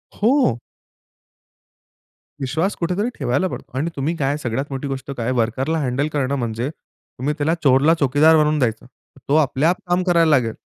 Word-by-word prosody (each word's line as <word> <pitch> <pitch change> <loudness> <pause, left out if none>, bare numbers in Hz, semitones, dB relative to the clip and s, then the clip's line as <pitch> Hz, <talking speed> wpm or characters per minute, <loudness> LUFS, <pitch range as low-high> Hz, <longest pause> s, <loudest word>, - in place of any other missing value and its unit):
हो. 230 - +2 1.8
विश्वास 160 +9 -1
कुठेतरी 185 +7 -1
ठेवायला 135 +6 0
पडतो - - -8
आणि 155 +5 -1
तुम्ही 145 +5 -1
काय 145 -1 -1
सगळ्यात 130 0 -3
मोठी 135 +1 -4
गोष्ट 135 0 -5
काय, 120 +2 -1
वर्करला 130 +6 0
हँडल 135 +1 -1
करणं 140 -1 0
म्हणजे, 120 0 -2
तुम्ही 150 -2 -7
त्याला 150 +2 +1
चोरला 140 +3 +5
चौकीदार 145 +4 +4
बनवून 150 0 +2
द्यायचं. 115 -4 -1 0.4
तो 145 - +3
आपल्या 155 0 +2
आप 180 - +1
काम 175 +1 +2
करायला 170 -2 +4
लागेल. 125 -7 +2
145 Hz, 155 wpm, -20 LUFS, 130-160 Hz, 1.8 s, चोरला